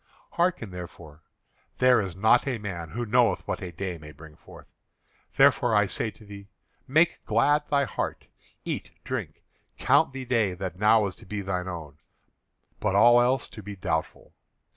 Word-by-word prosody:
Hearken 170 - 0
therefore. 85 -4 -10 0.6
There 125 -2 +5
is 95 -4 -5
not 110 +7 +3
a 130 -3 -1
man 90 -6 -6
who 120 +7 -4
knoweth 115 -3 +2
what - - -3
a 90 -2 -6
day 90 0 -5
may 75 0 -11
bring 80 0 -14
forth. - - -15 0.7
Therefore - - +4
I - - +4
say 110 - -2
to 110 - -16
thee: 100 -1 -11 0.4
Make 160 +6 +2
glad 145 +7 +2
thy 140 -1 +2
heart; 135 - -4 0.4
eat, - - -4
drink, - - -5 0.3
count - - +3
the 135 -1 -7
day 115 -7 +1
that 90 -1 -6
now 105 +1 +4
is 95 - -4
to 110 - -15
be 105 +1 -4
thine 95 -1 -3
own, 80 -5 -8 0.8
but 105 -2 0
all 120 +4 +6
else 125 +1 +1
to 110 - -10
be 100 0 -8
doubtful. 80 -4 -4
105 Hz, 170 wpm, -26 LUFS, 90-120 Hz, 0.8 s, all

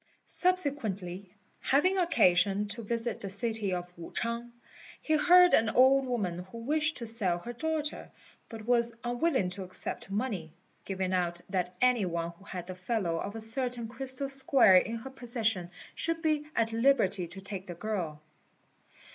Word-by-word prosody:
Subsequently, 215 - -2 0.3
having 370 +8 +2
occasion 200 - +3
to 225 +3 -6
visit 230 +1 -2
the 195 - -5
city 220 0 0
of 180 0 -4
Wu 170 - -10
ch'ang, 235 +1 -3 0.5
he 315 - 0
heard 360 +3 +6
of - - +8
an 220 0 -1
old 265 +3 +5
woman 200 -9 -2
who 210 +5 -11
wished 305 +7 +1
to 235 - -6
sell 215 -6 +2
her 235 +7 -7
daughter, 310 +3 -3 0.4
but 220 -2 -9
was 235 -1 +3
unwilling 245 - 0
to 195 - -5
accept 185 +1 -1
money, 200 -6 -3 0.3
giving 190 -1 -2
out 175 -1 0
that 180 -2 -1
any 250 -5 +3
one 170 -1 -3
who 170 +3 -20
had 180 -3 -6
the 185 - -6
fellow 185 -2 -2
of 200 +4 -5
a 225 - -5
certain 245 +1 -1
crystal 260 +3 -2
square 270 -7 +5
in 225 +5 +1
her 230 +4 -7
possession 225 -8 -1 0.2
should 330 0 -2
be 305 -2 +1
at 225 0 +1
liberty 225 -7 +2
to 190 +3 -10
take 195 -1 -7
the 175 - -6
girl. 175 -6 -4
225 Hz, 165 wpm, -30 LUFS, 185-260 Hz, 0.5 s, of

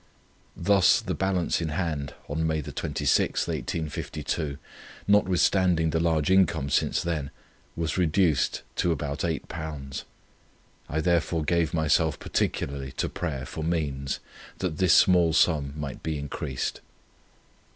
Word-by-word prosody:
Thus 100 -4 +4
the - - -3
balance 95 -3 0
in 80 - -1
hand 75 -4 -2
on 80 +3 -1
May 80 -1 -1
26, - - 0
1852, 75 -2 -3 0.5
notwithstanding 95 -4 +3
the 80 - +1
large 80 -1 +1
income 90 -7 +3
since - - +1
then, 75 -5 -2 0.5
was 85 +2 -1
reduced 85 -4 +2
to 90 - +2
about 75 -2 -3
£8. 75 -3 -4 0.9
I 80 +2 0
therefore 85 -1 +1
gave 85 +1 +1
myself 80 0 +2
particularly 70 -1 -2
to - - -2
prayer 70 -6 -4
for 80 - -6
means, 70 -5 -1 0.4
that 85 -5 -3
this 95 -2 +5
small 90 -4 +5
sum 75 -4 +2
might 70 -3 -5
be 80 -2 -2
increased. 70 -2 -4
80 Hz, 120 wpm, -27 LUFS, 75-85 Hz, 0.9 s, this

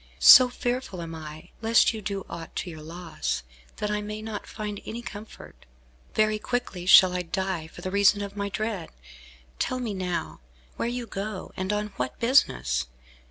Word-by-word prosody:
So 255 -1 +10
fearful 245 -5 -3
am 165 0 -7
I, 155 -1 -9
lest 225 +1 +4
you 220 - -6
do 195 -1 -4
aught 165 -1 -8
to 180 - -3
your 160 -1 -9
loss, 165 - -4 0.3
that 210 0 -2
I 210 0 0
may 210 +1 -6
not 220 -2 -6
find 210 -2 -5
any 235 +2 -6
comfort. 210 - -10 0.5
Very 215 0 +2
quickly 210 -7 -3
shall 185 0 +8
I 180 - 0
die 180 -2 -3
for 175 +3 -8
reason 200 +1 +4
of 200 0 -7
my 200 0 -2
dread. 210 -4 -3 0.7
Tell 255 - 0
me 235 -4 -3
now, 180 - -3 0.4
where 235 - -1
you 245 0 -3
go, 200 -2 -5
and 185 +1 -2
on 210 0 -1
what 125 0 -3
business! 65 - +2
200 Hz, 170 wpm, -26 LUFS, 175-215 Hz, 0.7 s, So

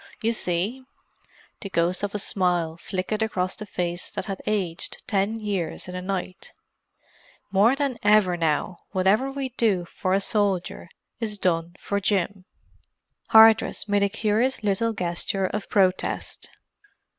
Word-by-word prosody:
You 230 +1 +2
see"—the 210 +2 -5
ghost 175 0 +1
of 205 0 -3
a - - +2
smile 180 -5 0
flickered 190 +5 -3
across 185 -4 -1
the 215 - -8
face 175 -1 -3
that - - -4
had 195 -2 -5
aged 190 -6 -1
ten 210 0 0
years 195 -7 -3
in 180 - -7
a 180 - -4
night—"more 195 +3 -3
than 275 -3 -2
ever 205 -3 +4
now, 165 +1 -1
whatever 205 +8 +2
we 270 -1 -3
do 215 -8 +1
for 185 +2 -2
a 195 - +4
soldier 200 -4 -1 0.3
is 215 -3 -2
done 170 -2 0
for 200 - -2
Jim." 195 -1 -1 0.8
Hardress 220 -1 +6
made 205 0 +2
a 200 - +3
curious 225 +4 0
little 210 +3 +1
gesture 185 +1 -1
of 205 +2 -4
protest. 185 -2 0
195 Hz, 135 wpm, -25 LUFS, 180-215 Hz, 0.8 s, Hardress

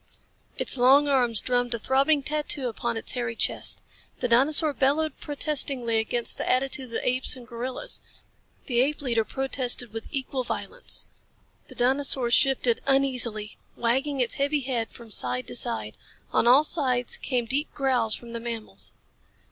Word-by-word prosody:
Its - - +1
long 275 +4 +5
arms 245 -5 +2
drummed 245 -1 0
a - - -3
throbbing 275 +5 +2
tattoo 300 -2 -1
upon 235 0 -3
its - - -4
hairy 240 -2 -3
chest. - - +1 0.4
The 250 - 0
dinosaur 290 +6 +3
bellowed 285 +2 0
protestingly 275 -6 +1
against 235 +2 -1
the - - -3
attitude 265 +1 0
of - - -15
the - - -3
apes 255 +1 +1
and 245 -2 -12
gorillas. 245 +1 -4 0.6
The 240 -4 0
ape 290 +2 -1
leader 235 -4 +1
protested 250 -2 +1
with 225 0 -6
equal 265 -1 -3
violence. - - -2 0.6
The - - -12
dinosaur 260 -1 +2
shifted 255 -2 +3
uneasily, 250 -6 +3 0.2
wagging 265 +4 0
its 240 - -1
heavy 285 +1 +1
head 245 -4 -2
from 230 -2 -13
side 125 -8 -1
to 125 - -7
side. 105 -3 -2 0.4
On - - +2
all 260 +5 +7
sides 255 -7 +1
came 250 -3 -2
deep 280 +6 -2
growls 250 -5 +2
from 235 -1 -11
the 235 - -4
mammals. 230 -2 -6
255 Hz, 155 wpm, -25 LUFS, 235-275 Hz, 0.6 s, all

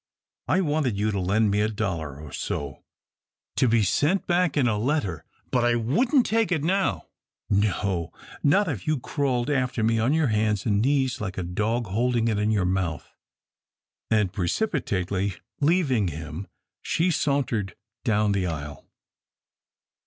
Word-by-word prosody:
I 190 - +3
wanted 145 - 0
you 105 +1 +1
to 100 - -1
lend 100 +3 +2
me 105 +1 +2
a 105 - +1
dollar 85 -10 -3
or 75 -2 -10
so 70 -1 -4 0.7
to 130 - +3
be 115 -1 +3
sent 150 - +1
back 175 -3 +1
in 130 -4 +3
a 110 - +1
letter, 105 - -1 0.3
but 125 -2 +2
I 120 0 +3
wouldn't 235 - +2
take 225 -2 +1
it 160 -5 +1
now 190 +4 0 0.5
no, 100 -4 0 0.3
not 195 +8 +3
if 120 - -4
you 155 -3 +1
crawled 130 -1 -1
after 125 -4 0
me 115 +1 +2
on 115 +4 +2
your 155 -3 +2
hands 105 -2 +1
an' 105 -3 +2
knees 135 -1 +1
like 95 -3 -4
a 95 - -2
dog 105 +7 -1
holdin' 115 +3 +1
it 105 -2 0
in 105 +1 +1
your 105 -4 +2
mouth," 90 -5 -2 1.0
and 105 -5 +2
precipitately 100 - -1 0.2
leaving 145 - +2
him, 80 +3 -6 0.3
she 175 +2 +1
sauntered 130 - 0 0.3
down 105 -3 +2
the 95 -2 0
aisle. 75 -4 -6
110 Hz, 155 wpm, -25 LUFS, 95-145 Hz, 1.0 s, I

